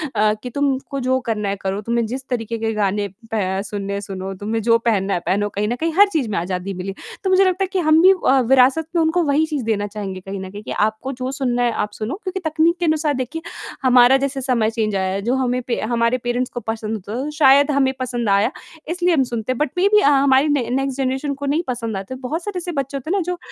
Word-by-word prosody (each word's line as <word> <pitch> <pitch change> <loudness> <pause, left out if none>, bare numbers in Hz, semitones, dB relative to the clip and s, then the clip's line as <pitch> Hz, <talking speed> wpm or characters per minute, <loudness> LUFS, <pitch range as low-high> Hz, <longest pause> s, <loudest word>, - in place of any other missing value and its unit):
अ, 210 0 +3
कि 250 - -4
तुमको 275 +1 -1
जो 260 0 +3
करना 210 -2 -1
है 200 - -1
करो, 195 +1 -2
तुम्हें 235 +1 0
जिस 260 +4 -6
तरीक़े 230 -2 -2
के 225 0 -2
गाने 205 -1 0 0.3
प 210 -4 0 0.2
सुनने 200 -1 -4
हैं 200 - -2
सुनो, 195 -1 -6
तुम्हें 215 +4 -3
जो 230 +1 +4
पहनना 200 -4 0
है - - 0
पहनो, 205 +2 +1
कहीं 205 +1 -2
न 240 - -1
कहीं 325 +6 -2
हर 410 +1 +8
चीज़ 280 -8 0
में 205 - -2
आज़ादी 180 +2 -3
मिले, 185 +1 -5 0.3
तो 380 - 0
मुझे 375 +1 +5
लगता 370 +1 +1
है - - 0
कि 380 - +1
हम 315 +1 +6
भी 375 +2 +8 0.2
अ, 270 +1 +5
विरासत 265 +4 +4
में 335 - +4
उनको 325 +2 +2
वही 295 +1 +2
चीज़ 300 -5 -3
देना 205 -2 0
चाहेंगे 200 -2 -6
कहीं 195 +1 -7
न 190 0 -6
कहीं 205 +1 -9
कि - - -7 0.2
आपको 220 +5 -5
जो 255 0 -4
सुनना 250 -3 0
है 240 - +2
आप 210 - -5
सुनो, 220 +5 -4
क्योंकि 380 -1 -3
तकनीक 315 -2 +1
के 350 - 0
अनुसार 310 -2 +1
देखिए 285 +5 -4 0.4
हमारा 250 0 +6
जैसे 275 0 -2
समय 245 -4 +1
चेंज 220 -3 -1
आया 190 -1 0
है, 195 - -2
जो 240 +5 0
हमें 250 -1 0
पे 240 - -1
हमारे 235 +2 +1
पेरेंट्स 245 +1 -1
को - - -4
पसंद 220 -1 -4
होता 205 0 -7
है 295 - -3
शायद 285 -1 +5
हमें 270 -2 +2
पसंद 240 -3 -2
आया 200 +5 +3 0.4
इसलिए 355 +1 +1
हम 280 -5 +3
सुनते 240 -1 -3
हैं, 255 - -2
बट 300 - 0
मेबी 405 +3 +5
अ, 285 - +5
हमारी 275 0 +4
न 290 -3 +1
नेक्स्ट 270 0 -1
जनरेशन 270 +2 -1
को 280 +1 -6
नहीं 295 +5 +1
पसंद 230 -5 -3
आते। 195 +7 -6
बहुत 320 +7 -3
सारे 410 -1 -4
ऐसे 355 0 -4
बच्चे 275 -2 -3
होते 290 +5 -5
ना 395 - +2
जो 360 - -2
250 Hz, 255 wpm, -20 LUFS, 215-285 Hz, 0.4 s, हर